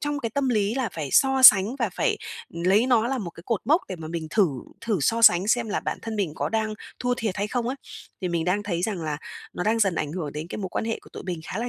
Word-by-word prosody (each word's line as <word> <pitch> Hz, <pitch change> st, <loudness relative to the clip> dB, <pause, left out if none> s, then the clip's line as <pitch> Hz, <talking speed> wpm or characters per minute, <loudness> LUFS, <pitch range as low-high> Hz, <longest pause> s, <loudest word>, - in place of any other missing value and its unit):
trong 290 Hz, 0 st, -2 dB
cái 230 Hz, -3 st, -3 dB
tâm 275 Hz, +3 st, 0 dB
lý 215 Hz, -5 st, +2 dB
là 260 Hz, -4 st, 0 dB
phải 155 Hz, -4 st, -4 dB
so 265 Hz, -1 st, +4 dB
sánh 205 Hz, +1 st, +8 dB
và 230 Hz, -5 st, 0 dB
phải -, -, +1 dB, 0.3 s
lấy 185 Hz, +7 st, +2 dB
nó 235 Hz, -3 st, +3 dB
là 265 Hz, 0 st, -1 dB
một 190 Hz, -7 st, -5 dB
cái 165 Hz, -, -14 dB
cột 230 Hz, -4 st, 0 dB
mốc 315 Hz, +5 st, +4 dB
để 185 Hz, -, -5 dB
mà 160 Hz, -1 st, -8 dB
mình 165 Hz, -1 st, -4 dB
thử 205 Hz, -1 st, +4 dB, 0.3 s
thử 220 Hz, -4 st, -1 dB
so 230 Hz, +11 st, +1 dB
sánh 185 Hz, -2 st, +6 dB
xem 235 Hz, 0 st, +2 dB
là 210 Hz, -, -1 dB
bản -, -, -3 dB
thân 225 Hz, -1 st, -5 dB
mình 190 Hz, -7 st, -1 dB
có -, -, -2 dB
đang 220 Hz, -1 st, -1 dB, 0.2 s
thua 245 Hz, 0 st, 0 dB
thiệt 220 Hz, -6 st, -2 dB
hay 205 Hz, +2 st, -2 dB
không 240 Hz, +1 st, -2 dB
ấy? 260 Hz, -, -3 dB, 0.4 s
Thì 185 Hz, -, -2 dB
mình 170 Hz, -1 st, -1 dB
đang 185 Hz, +4 st, 0 dB
thấy 175 Hz, -4 st, -3 dB
rằng 190 Hz, -3 st, -2 dB
là 155 Hz, -2 st, -2 dB, 0.4 s
nó -, -, -4 dB
đang 225 Hz, +2 st, +2 dB
dần 195 Hz, -5 st, +2 dB
ảnh 150 Hz, -2 st, -2 dB
hưởng 160 Hz, -5 st, -4 dB
đến 150 Hz, +2 st, -5 dB
cái -, -, -6 dB
mối 190 Hz, -3 st, -4 dB
quan -, -, -2 dB
hệ 225 Hz, 0 st, -2 dB
của -, -, -17 dB
tụi -, -, -8 dB
mình 180 Hz, -3 st, -4 dB
khá 185 Hz, -, -5 dB
là 240 Hz, +2 st, -2 dB
210 Hz, 295 wpm, -25 LUFS, 175-230 Hz, 0.4 s, sánh